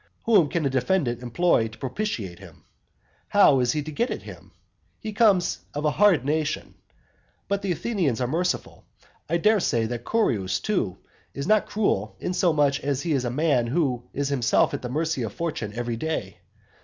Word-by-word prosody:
Whom 200 -10 +4
can 165 -1 -1
a - - +2
defendant 130 -2 0
employ 125 -1 +2
to 110 - -13
propitiate 125 - -4
him? 85 -6 -15 0.6
How 175 -10 +5
is 125 -1 +2
he 150 - -1
to 155 - -7
get 235 - -1
at - - -5
him? - - -12 0.5
He 215 -1 -6
comes 205 -5 +3 0.2
of 150 +1 -2
a 150 - +3
hard 180 -6 +4
nation. 155 +1 -1 0.7
But 200 0 -1
the 195 -2 -1
Athenians 175 - -1
are 125 - 0
merciful. 170 +8 -2 0.5
I 170 - +2
dare 210 +5 +3
say 115 -10 +1
that 120 +1 -4
Curius, 110 - +1
too, 180 - -1 0.4
is 140 - -3
not 215 +2 +3
cruel, 110 - 0
inasmuch 155 -6 +1
as 140 -1 -2
he 170 - -2
is 130 -3 0
a - - 0
man 130 -2 +1
who 130 -3 0
is 140 0 -2
himself 130 -5 +2
at - - -3
the 125 - -5
mercy 155 +1 -1
of 110 -4 -3
fortune 155 -11 -3
every 120 -1 -3
day. 115 - -4
145 Hz, 180 wpm, -25 LUFS, 120-180 Hz, 0.7 s, How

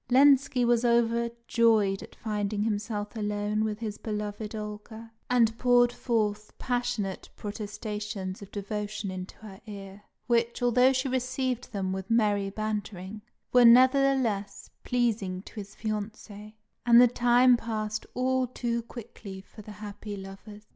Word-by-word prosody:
Lenski 265 -1 +5
was 240 0 +3
overjoyed 235 -3 +2
at - - -12
finding 210 -1 -2
himself 210 0 -3
alone 210 0 -1
with 215 -1 -2
his 215 -2 -5
beloved 210 0 -4
Olga, 215 +2 -7 0.2
and 230 -3 +3
poured 245 -1 +4
forth 215 -3 -2
passionate 245 -6 -2
protestations 210 -2 -5
of 200 - -10
devotion 205 0 -4
into 185 0 -7
her 210 -1 -12
ear, 200 -1 -9 0.2
which, 235 0 +1
although 250 +2 +5
she 265 +1 0
received 255 -1 -2
them 190 -3 -2
with 190 0 -5
merry 205 -3 +2
bantering, 210 -1 -4 0.3
were 250 -1 +7
nevertheless 255 -4 +4
pleasing 210 -7 -1
to - - -13
his 205 -2 -8
fiancée; 215 -1 -6 0.3
and 235 -1 +7
the 245 - +8
time 245 +1 +5
passed 215 -2 -3
all 255 +1 +1
too 235 -1 -2
quickly 220 -4 -10
for 200 +3 -13
the 210 0 -10
happy 210 0 -7
lovers. 195 +2 -11
215 Hz, 135 wpm, -28 LUFS, 205-240 Hz, 0.3 s, the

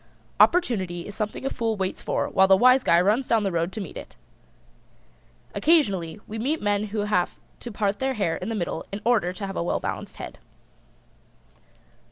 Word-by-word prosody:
Opportunity 190 - +2
is 205 - -8
something 215 +5 -4
a - - +1
Fool 225 -2 -1
waits 190 -1 -3
for - - -1
while 190 0 +4
the 190 0 +6
Wise 255 +4 +5
Guy 170 - +4
runs 215 +8 +2
down 225 -2 +2
the 195 - 0
road 170 +1 -1
to 220 - -4
meet - - -8
it. - - -9 1.4
Occasionally 205 - +2
we 220 +1 -6
meet 290 +8 0
men 205 0 0
who 210 0 -3
have 205 -4 0 0.2
to 240 - -7
part 205 -1 -1
their 265 0 -1
hair 195 -7 0
in 185 - -5
the 225 - -2
middle 175 -5 -3
in 200 +1 -5
order 220 -7 +2
to 190 +2 -6
have 195 -1 -6
a - - -1
well 170 - -1
balanced - - -5
head. - - -9
205 Hz, 195 wpm, -25 LUFS, 190-235 Hz, 1.4 s, the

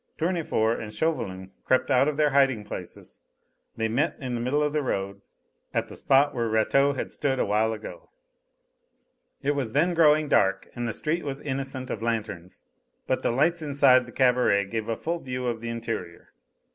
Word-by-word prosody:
Tournefort 160 -10 0
and 105 -2 -7
Chauvelin 95 -9 -2
crept 130 - +1
out 130 +2 +4
of 150 -1 -1
their 150 -1 +3
hiding 135 -5 +3
places. 105 - -9 0.6
They 110 0 0
met 135 +9 0
in 130 -3 -4
the 120 - -2
middle 140 +5 +1
of 150 0 -1
the 150 - +1
road, 100 -6 -3 0.5
at - - 0
the - - -9
spot 140 +2 +3
where 115 -2 -1
Rateau 135 +6 +3
had 130 - -4
stood 135 -2 -1
a - - +1
while 110 +2 +1
ago. 110 -1 -8 1.3
It 140 - +2
was 135 -6 -2
then 170 +5 +2
growing 155 -2 +4
dark 95 -7 +2
and 120 0 -3
the - - -1
street 165 +3 -2
was 140 -1 -4
innocent 135 -2 -4
of 110 - -4
lanterns, 110 -6 -4 0.4
but - - 0
the - - 0
lights 165 +8 +1
inside 135 -4 +4
the - - -10
cabaret 125 -6 +3
gave 110 +2 -4
a 115 - -1
full 170 +1 -3
view 125 -3 -5
of 115 -2 -2
the 115 - -4
interior. 115 -7 -6
125 Hz, 185 wpm, -26 LUFS, 110-145 Hz, 1.3 s, out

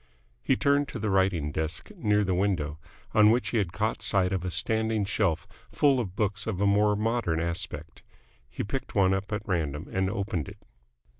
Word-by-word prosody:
He 135 - +2
turned 140 +1 +2
to - - -6
the 105 -2 -1
writing 95 -6 +2
desk 80 +1 -4
near 105 0 +2
the 95 -2 0
window, 90 -5 0 0.3
on 105 -1 +6
which 120 +2 +2
he 115 - +1
had 95 -5 -1
caught 110 +5 -1
sight 95 -3 +2
of 95 -2 -1
a 95 - -2
standing 110 +2 0
shelf 95 -5 0 0.2
full 140 -3 +3
of 95 -6 -4
books 105 0 -1
of 105 -5 -2
a 100 - +2
more 105 +1 +4
modern 110 -6 0
aspect. 85 0 -4 0.5
He - - -4
picked 135 +6 -5
one 95 -2 +4
up 95 +2 -3
at 105 0 -3
random 80 -3 -2
and 95 0 0
opened 95 -6 -2
it. - - -12
100 Hz, 195 wpm, -28 LUFS, 90-110 Hz, 0.5 s, on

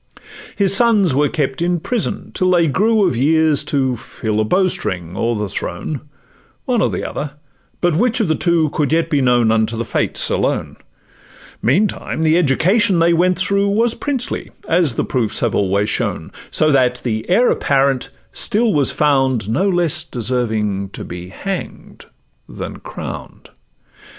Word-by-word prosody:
His 195 -1 +3
sons 205 - +3
were 145 +2 +2
kept 140 -2 -2
in 175 0 +1
prison, 235 +6 -3
till 185 - +1
they 175 -2 +4
grew 210 +7 +2
Of 150 - -1
years 155 +3 +3
to 135 -4 0
fill 110 -1 -4
a - - +3
bowstring 100 - 0
or 115 +3 0
the 105 -1 -2
throne, 110 - -5 0.6
One 245 -4 +1
or - - +2
the - - -3
other, 145 -1 -5 0.5
but 175 -3 +2
which 240 +6 +2
of 220 - +1
the 160 - +2
two 165 -2 +1
Could 150 -2 -1
yet 165 0 +1
be 145 -2 +2
known 120 -3 +3
unto 115 0 0
the 115 - -2
fates - - -1
alone; - - -1 0.8
Meantime 165 - 0
the 160 0 +3
education 180 - +3
they 170 +1 +3
went 180 +2 +2
through 200 +2 +1
Was 225 +3 +2
princely, 270 -4 -3 0.2
as 165 -7 +2
the - - -1
proofs 115 -5 -1
have - - 0
always 100 +1 +1
shown: - - -2 0.2
So 155 0 +2
that 125 -2 +2
the 110 0 -3
heir 235 +7 +4
apparent 135 -1 +1 0.2
still 225 -1 0
was 145 -3 +2
found 135 -7 +1
No 190 - +1
less 175 -4 +1
deserving 110 -5 -2
to - - -7
be 90 +1 -8
hang'd 190 - -7 0.4
than - - -7
crown'd. - - -9
150 Hz, 160 wpm, -18 LUFS, 120-185 Hz, 0.8 s, they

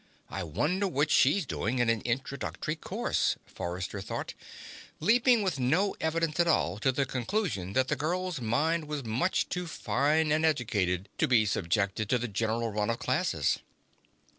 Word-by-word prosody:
I - - -3
wonder 150 - 0
what 150 -3 0
she's 150 +7 +4
doing 120 -1 -2
in 120 -1 +2
an 115 -2 +2
Introductory 135 +5 -3
course, 160 - 0
Forrester 90 +3 -5
thought, 100 - -5 0.7
leaping 235 - +4
with 185 -8 -1
no 165 +11 +2
evidence 160 0 0
at 170 - +4
all 100 - +1
to 130 +4 +2
the 135 +2 0
conclusion 125 - -2
that 130 +2 +2
the - - 0
girl's 175 0 -2
mind 155 +9 +1
was 150 -2 -3
much 120 - 0
too 180 -1 -3
fine 155 0 +1
and 155 +1 +2
educated 100 - +1
to - - +3
be 115 -4 +4
subjected 100 +1 0
to 125 - +3
the 125 +1 -3
general 115 +2 -1
run 105 +1 -1
of 115 - 0
classes. 130 - 0
130 Hz, 165 wpm, -29 LUFS, 110-160 Hz, 0.7 s, she's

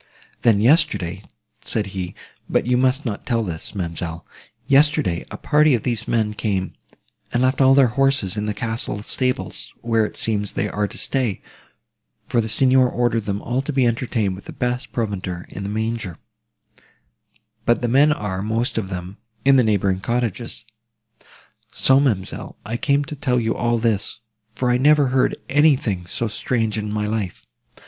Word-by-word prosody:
'Then 110 -4 +4
yesterday,' 100 - +2 0.4
said 110 -2 -1
he, 90 -2 -4 0.3
but - - +1
you 125 +1 +2
must 130 +3 +2
not 105 -4 -3
tell 115 -2 0
this, 85 0 -5
ma'amselle, 85 -2 -4 0.4
'yesterday, 140 - +3
a - - -7
party 150 -2 +4
of 115 - -3
these 120 -3 -2
men 110 -2 +1
came, 100 -3 -2 0.6
and 120 +1 +1
left 130 +2 +2
all 135 0 +6
their 135 -3 +5
horses 135 -7 +2
in 105 0 -2
the 105 - -1
castle 110 -1 -3
stables, 130 +3 -2
where, 115 -1 +2
it 105 - -4
seems, 105 -2 0
they 105 - -1
are 105 0 -1
to - - -9
stay, 125 -8 0 0.9
for 120 - +1
the 110 - -4
Signor 130 +2 +4
ordered 120 -3 0
them 100 0 -3
all 125 +3 -1
to 140 - -4
be 135 -3 +2
entertained 115 -4 0
with 95 - -10
the - - -8
best 125 +1 -2
provender 95 -6 -3
in 100 - -7
the 100 - -4
manger; 110 -4 -3 1.5
but 120 +1 +2
the - - +2
men 140 +5 +5
are, 105 -9 -2
most 115 +3 -1
of 95 -4 -5
them, 90 +2 -6 0.3
in 135 0 +6
the 130 - +5
neighbouring 100 -4 +1
cottages.' 120 0 -2 1.1
"So, 135 +3 +4
ma'amselle, 110 -10 -1
I 110 +3 -3
came 140 +3 +1
to 150 - -7
tell 125 -3 0
you 115 -1 0
all 120 -1 +1
this, 110 -1 -1 0.3
for 125 -1 +1
I 125 - +3
never 145 0 +5
heard 130 0 +2
anything 130 - +2
so 115 - -2
strange 110 0 -1
in 105 -1 -3
my 105 0 -1
life. 105 -4 -3
115 Hz, 170 wpm, -21 LUFS, 105-130 Hz, 1.5 s, all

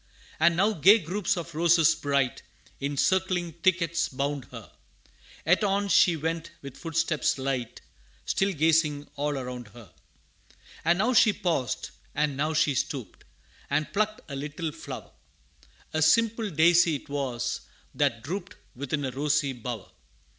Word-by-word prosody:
And 170 +1 +4
now 205 +4 +3
gay 195 +5 +7
groups 195 +1 -1
of 170 0 -6
roses 165 0 +4
bright, 140 -3 0 0.4
In 140 +1 -3
circling 185 0 +1
thickets 170 -2 +1
bound 140 0 -3
her - - -11 0.7
Yet 175 +6 +3
on 200 0 +1
she 175 -3 +5
went 165 +1 -3
with 140 -2 -8
footsteps 165 -2 0
light, 130 -3 -3 0.4
Still 195 +1 +1
gazing 155 -3 +1
all 145 0 -1
around 125 -2 -6
her. 115 -6 -14 0.9
And 170 +2 +3
now 225 +7 +2
she 220 -1 +6
paused, 165 - -2 0.2
and 145 -1 0
now 155 +3 -1
she 150 -1 +3
stooped, 125 -6 -4 0.4
And 150 +2 -1
plucked 215 +1 0
a 140 - -6
little 150 +3 -4
flower - - -9 0.8
A 155 - 0
simple 225 +6 +3
daisy 170 -1 +4
'twas, 135 -4 -3 0.3
that 115 -1 0
drooped 190 +6 -5 0.2
Within 140 +2 -3
a 130 - -2
rosy 145 +1 0
bower. 120 -3 -7
155 Hz, 140 wpm, -27 LUFS, 140-175 Hz, 0.9 s, gay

